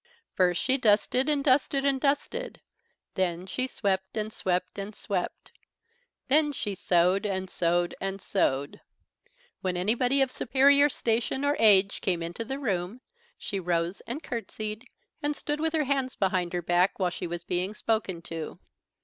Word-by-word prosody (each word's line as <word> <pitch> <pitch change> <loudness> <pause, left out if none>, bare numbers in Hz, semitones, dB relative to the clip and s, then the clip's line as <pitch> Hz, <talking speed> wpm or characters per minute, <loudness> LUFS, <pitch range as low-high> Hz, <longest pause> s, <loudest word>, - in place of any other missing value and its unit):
First 180 -2 +2
she 265 +1 +2
dusted 235 +5 +3
and 290 -2 +2
dusted 275 0 +2
and 270 -2 +2
dusted; 295 - -1 0.5
then 180 -1 -1
she 255 +7 -2
swept 190 -4 -2
and 215 0 -3
swept 180 +1 -2
and 200 +2 -6
swept; 185 -3 -4 0.8
then 295 +2 +4
she 205 -6 -3
sewed 180 +1 +2
and 190 -2 -2
sewed 175 0 0
and 195 0 -3
sewed. 140 -8 -1 0.8
When 185 -1 -1
anybody 245 +8 +2
of 265 - -2
superior 280 +3 +4
station 240 +2 -1
or 290 +1 +2
age 200 -3 +5
came 175 -3 0
into 170 +7 -4
the 265 +4 -4
room 205 -3 -2 0.4
she 200 - -4
rose 170 0 -1
and 280 +7 -5
curtsied 220 -3 -5 0.3
and 295 0 -1
stood 295 +1 -3
with 320 +1 0
her 310 - +2
hands 270 -2 -1
behind 185 -3 0
her 175 -1 -2
back, 175 +3 +2
while 185 -2 0
she 180 - -5
was 170 0 -5
being 180 +4 -2
spoken 205 -8 -1
to. 165 -2 -6
205 Hz, 160 wpm, -28 LUFS, 180-265 Hz, 0.8 s, age